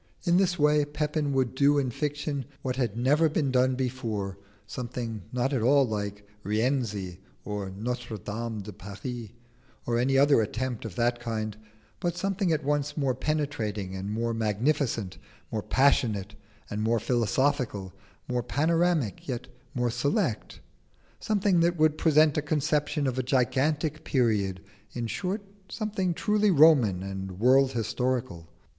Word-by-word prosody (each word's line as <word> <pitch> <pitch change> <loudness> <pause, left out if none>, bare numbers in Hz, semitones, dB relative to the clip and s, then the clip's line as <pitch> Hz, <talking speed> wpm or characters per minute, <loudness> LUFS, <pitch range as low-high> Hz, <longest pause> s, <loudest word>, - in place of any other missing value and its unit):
In 175 -1 +3
this 185 -2 +2
way 150 -1 +4
Pepin 150 0 -1
would 130 -3 +1
do 140 +2 +4
in 135 -3 +1
fiction 145 0 -3 0.2
what 130 -1 -1
had 120 -5 -1
never 145 +6 +3
been 145 -3 0
done 130 0 +3
before: 115 -7 -3 0.3
something 120 -3 -5
not 125 +3 0
at 130 - +1
all 135 +3 +4
like 105 -1 -4 0.2
'Rienzi' 105 -5 -1 0.3
or 105 -2 -4
'Notre 115 +3 -4
Dame 110 +2 -4
de 105 +1 -8
Paris,' 105 +4 -7 0.6
or 120 0 +1
any 135 +2 +2
other 140 -3 +5
attempt 120 +2 -3
of 105 -6 -6
that 120 +2 +1
kind; 110 -3 -3 0.4
but 175 -1 -2
something 195 -1 0
at 155 -2 0
once 145 +1 -1
more 135 -3 +1
penetrating 125 -9 -2
and 95 +1 -4
more 115 +2 -1
magnificent, 115 -1 0 0.3
more 110 - -1
passionate 110 -6 +2 0.3
and 105 +1 -4
more 115 +1 +2
philosophical, 120 -3 0 0.3
more 125 -1 0
panoramic 160 - +1
yet 125 -4 -4 0.3
more 120 -1 +1
select: 120 -2 -1 0.6
something 200 -4 +2
that 170 +1 +2
would 155 -1 +3
present 155 -1 +4
a - - -1
conception 150 0 0
of 130 -1 -1
a - - +3
gigantic 140 +5 0
period; 105 -9 +1 0.3
in 120 -1 -3
short 190 - -3 0.3
something 200 -5 -2
truly 210 +2 +2
Roman 140 - +5
and 95 -1 -5
world 130 +3 +4
historical. 115 -7 -2
125 Hz, 145 wpm, -28 LUFS, 110-150 Hz, 0.6 s, other